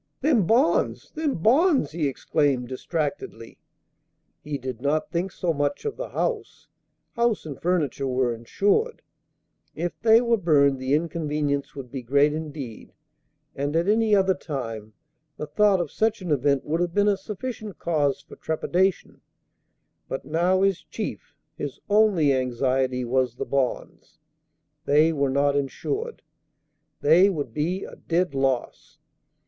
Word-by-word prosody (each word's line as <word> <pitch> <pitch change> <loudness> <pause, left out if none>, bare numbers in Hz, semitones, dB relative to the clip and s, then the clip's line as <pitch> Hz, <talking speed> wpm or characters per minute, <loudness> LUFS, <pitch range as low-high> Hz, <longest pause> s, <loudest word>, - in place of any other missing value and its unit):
"Them 255 - +3
bonds! 250 +7 +2
them 310 -3 -1
bonds!" 265 - +3
he 155 -2 -1
exclaimed, 135 -2 0
distractedly. 140 -4 -4 0.8
He 150 -1 -3
did 130 -3 -6
not 150 +4 0
think 175 +2 -1
so 175 -2 -1
much 145 -1 -2
of 435 - -2
the - - -6
house: - - -3 0.5
house 235 -5 +1
and 145 -4 -8
furniture 155 -6 0
were 125 -2 +1
insured; 205 - 0 0.7
if 175 +1 -2
they 225 0 +6
were 235 -1 +2
burned 140 -7 +3
the 130 +2 +1
inconvenience 150 -3 -2
would 130 -4 -8
be 135 -1 -5
great 140 +4 +3
indeed, 150 -7 -7 0.6
and 145 +2 -2
at 170 +3 +1
any 215 0 +3
other 190 -1 +3
time 115 - -6 0.4
the - - -4
thought 205 +3 +3
of 170 -5 -3
such 220 0 0
an 175 - -3
event 140 -1 +1
would 165 +3 -1
have 175 -1 -2
been 205 0 +3
a 205 - +4
sufficient 210 +1 -6
cause 145 -4 0
for - - -14
trepidation; 180 +4 -1 0.9
but 135 - -4
now 180 +4 +2
his 195 -2 +2
chief, - - -7 0.2
his 145 -2 -5
only 200 -9 +4
anxiety 130 0 0
was 125 0 0
the - - -4
bonds. 135 -3 -3 0.7
They 155 +3 +4
were 140 -2 0
not 140 +1 +2
insured. 410 - -3 0.8
They 170 +7 +6
would 145 - -4
be 170 +7 -1
a - - -10
dead 175 -2 -1
loss. 135 -2 -2
155 Hz, 145 wpm, -25 LUFS, 135-195 Hz, 0.9 s, they